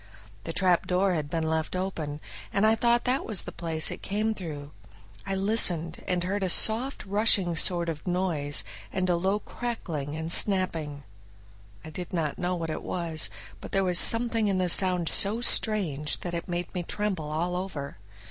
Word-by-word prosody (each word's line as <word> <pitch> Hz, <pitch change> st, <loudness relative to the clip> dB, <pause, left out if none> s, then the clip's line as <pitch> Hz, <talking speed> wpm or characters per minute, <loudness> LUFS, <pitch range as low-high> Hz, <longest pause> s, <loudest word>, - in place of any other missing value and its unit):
The 165 Hz, -, -4 dB
trapdoor 185 Hz, +1 st, +1 dB
had 150 Hz, -4 st, -3 dB
been 165 Hz, 0 st, -2 dB
left 160 Hz, +2 st, -2 dB
open, 160 Hz, -6 st, -4 dB, 0.3 s
and 200 Hz, -, +1 dB
I 220 Hz, -, +4 dB
thought 235 Hz, +1 st, +2 dB
that 255 Hz, +2 st, 0 dB
was 215 Hz, -4 st, -4 dB
the -, -, -8 dB
place 160 Hz, -2 st, +4 dB
it -, -, -7 dB
came 215 Hz, +2 st, -2 dB
through. 150 Hz, -7 st, -8 dB, 0.6 s
I 195 Hz, -, -2 dB
listened, 185 Hz, -5 st, +3 dB
and 180 Hz, -1 st, -1 dB
heard 200 Hz, +3 st, -2 dB
a 185 Hz, -, -1 dB
soft 230 Hz, +9 st, +1 dB
rushing 200 Hz, -3 st, +3 dB
sort 170 Hz, 0 st, +2 dB
of 160 Hz, +1 st, -6 dB
noise 170 Hz, -6 st, 0 dB, 0.3 s
and 185 Hz, -1 st, -2 dB
a -, -, +2 dB
low 190 Hz, +4 st, 0 dB
crackling 170 Hz, -12 st, -6 dB
and 160 Hz, +1 st, -4 dB
snapping. 165 Hz, -9 st, +2 dB, 0.8 s
I 160 Hz, -, -9 dB
did 180 Hz, +3 st, -8 dB
not 160 Hz, -4 st, -2 dB
know 180 Hz, +1 st, -1 dB
what 165 Hz, -2 st, -4 dB
it 155 Hz, -, -5 dB
was, 160 Hz, -8 st, 0 dB, 0.3 s
but -, -, -11 dB
there 195 Hz, -, +1 dB
was 180 Hz, -2 st, +4 dB
something 230 Hz, -2 st, +4 dB
in 195 Hz, -2 st, 0 dB
the 185 Hz, -1 st, 0 dB
sound 180 Hz, -1 st, +5 dB
so 205 Hz, +7 st, +2 dB
strange 185 Hz, -11 st, 0 dB
that 175 Hz, -, -5 dB
it 170 Hz, -, -5 dB
made 175 Hz, 0 st, -4 dB
me 180 Hz, -, -3 dB
tremble 185 Hz, -4 st, -3 dB
all 170 Hz, +4 st, -2 dB
over. 155 Hz, -, -6 dB
180 Hz, 180 wpm, -26 LUFS, 160-200 Hz, 0.8 s, sound